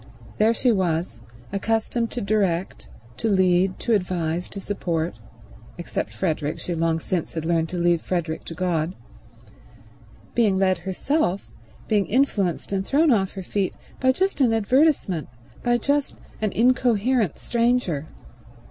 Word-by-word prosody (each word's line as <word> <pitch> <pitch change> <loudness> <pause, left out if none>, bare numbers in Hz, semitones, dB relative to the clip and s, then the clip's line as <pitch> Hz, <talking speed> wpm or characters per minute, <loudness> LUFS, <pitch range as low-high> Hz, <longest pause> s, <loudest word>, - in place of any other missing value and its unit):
There 215 +2 +5
she 245 +1 +2
was, 170 - -1 0.3
accustomed 225 +3 0
to 245 - -4
direct, 195 -4 -1 0.3
to 225 - -1
lead, 185 -1 +3
to 235 - +1
advise, 180 -3 -1
to 200 - -7
support—except 160 - -5
Frederick; 155 -4 -2
she 175 - -4
long 165 0 +1
since 170 0 -3
had 160 -1 -3
learned 165 -1 +1
to 180 - -4
leave 170 -1 +2
Frederick 170 -3 -2
to 165 - -7
God—being 155 - -4
led 185 -2 +2
herself, 190 - -1 0.4
being 205 -2 +2
influenced 205 -9 +1
and 190 -1 0
thrown 290 +8 +3
off 195 -5 +2
her 190 - -6
feet, 195 +1 -1 0.2
by 260 0 +4
just 375 +2 0
an 240 -4 +4
advertisement, 225 - +2 0.3
by 240 0 +2
just 285 +4 0 0.3
an 215 -2 +1
incoherent 240 - +2
stranger. 235 - 0
190 Hz, 130 wpm, -24 LUFS, 165-230 Hz, 0.4 s, There